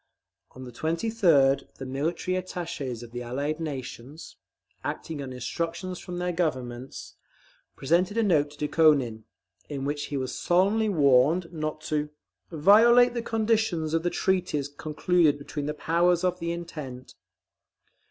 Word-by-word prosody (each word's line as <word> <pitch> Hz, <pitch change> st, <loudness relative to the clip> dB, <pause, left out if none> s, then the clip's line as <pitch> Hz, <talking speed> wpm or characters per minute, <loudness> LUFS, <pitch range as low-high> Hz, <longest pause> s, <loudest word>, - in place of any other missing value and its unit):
On 130 Hz, -, -10 dB
the 125 Hz, -, -9 dB
23d, 160 Hz, -, +2 dB
the 135 Hz, -, -8 dB
military 155 Hz, +7 st, -2 dB
attaches 165 Hz, -9 st, -4 dB
of 115 Hz, -, -11 dB
the 120 Hz, 0 st, -5 dB
Allied 140 Hz, +6 st, -3 dB
nations, 140 Hz, -1 st, -7 dB, 0.5 s
acting 155 Hz, -3 st, -4 dB
on 135 Hz, -2 st, -6 dB
instructions 170 Hz, +8 st, -4 dB
from 180 Hz, -1 st, -7 dB
their 180 Hz, 0 st, -1 dB
Governments, 130 Hz, -7 st, -4 dB, 0.6 s
presented 175 Hz, +9 st, +1 dB
a 230 Hz, -, +3 dB
note 155 Hz, -8 st, +3 dB
to 145 Hz, -, -16 dB
Dukhonin, 140 Hz, -9 st, +3 dB, 0.4 s
in 140 Hz, -2 st, -4 dB
which 145 Hz, +1 st, -2 dB
he 145 Hz, -, -4 dB
was 130 Hz, -1 st, -3 dB
solemnly 200 Hz, +5 st, +2 dB
warned 155 Hz, +2 st, +3 dB
not 155 Hz, -1 st, -4 dB
to 150 Hz, -1 st, -2 dB, 0.4 s
"violate 230 Hz, +9 st, +6 dB
the 240 Hz, -, -2 dB
conditions 220 Hz, -8 st, 0 dB
of 165 Hz, -, +2 dB
the 175 Hz, -, 0 dB
treaties 180 Hz, -7 st, 0 dB
concluded 155 Hz, +1 st, +1 dB
between 145 Hz, 0 st, -5 dB
the 150 Hz, -, -3 dB
Powers 175 Hz, +3 st, +2 dB
of 180 Hz, 0 st, 0 dB
the 170 Hz, 0 st, -2 dB
Entente." 150 Hz, -7 st, -7 dB
155 Hz, 140 wpm, -27 LUFS, 140-180 Hz, 0.6 s, violate